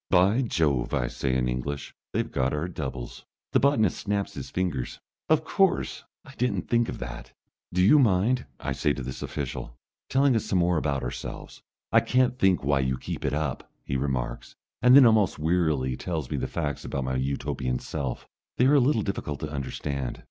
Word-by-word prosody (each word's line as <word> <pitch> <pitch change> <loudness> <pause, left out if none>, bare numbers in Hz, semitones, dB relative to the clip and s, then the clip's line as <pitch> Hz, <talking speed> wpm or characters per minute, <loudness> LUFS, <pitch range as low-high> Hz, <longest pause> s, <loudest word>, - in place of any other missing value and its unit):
"By 95 +7 +4
Jove!" 75 - +1
I - - +1
say 65 +2 -2
in 65 -1 +1
English. 65 +3 -3 0.2
"They've - - -1
got 65 +2 0
our 75 +4 -2
doubles!" 65 -8 -6 0.3
The - - +4
botanist 115 -9 +2
snaps 100 -1 -2
his - - -7
fingers. 90 -9 -2 0.3
"Of 155 0 +4
course! 185 -5 +1 0.2
I 140 - -13
didn't 125 0 0
think 120 -1 +2
of - - -5
that." - - -7 0.4
"Do 90 +1 +2
you 145 +10 +7
mind," 120 +2 +2
I - - -3
say 75 - +1
to 70 - -5
this 65 +1 -6
official, - - -5 0.3
"telling 135 -1 +3
us 110 - 0
some 95 - 0
more 90 -1 +3
about 70 -3 -1
ourselves?" - - -6 0.3
"I - - +7
can't 125 0 +1
think 95 -5 +3
why 70 0 +2
you 65 -1 0
keep - - -6
it - - 0
up," 75 -4 -3
he 65 - -3
remarks, 65 -3 -2 0.3
and 125 +2 +7
then 140 -2 +10
almost 110 -4 +4
wearily 80 -5 +1
tells 80 -2 -4
me - - -1
the - - -2
facts 75 -3 -3
about 70 - -3
my 65 0 -2
Utopian 65 -1 -1
self. 65 0 -4 0.3
They 125 - +4
are 135 - +5
a 145 - +7
little 125 -4 +2
difficult 75 -7 -3
to 75 - -4
understand. 70 -1 -4
80 Hz, 190 wpm, -27 LUFS, 65-110 Hz, 0.4 s, then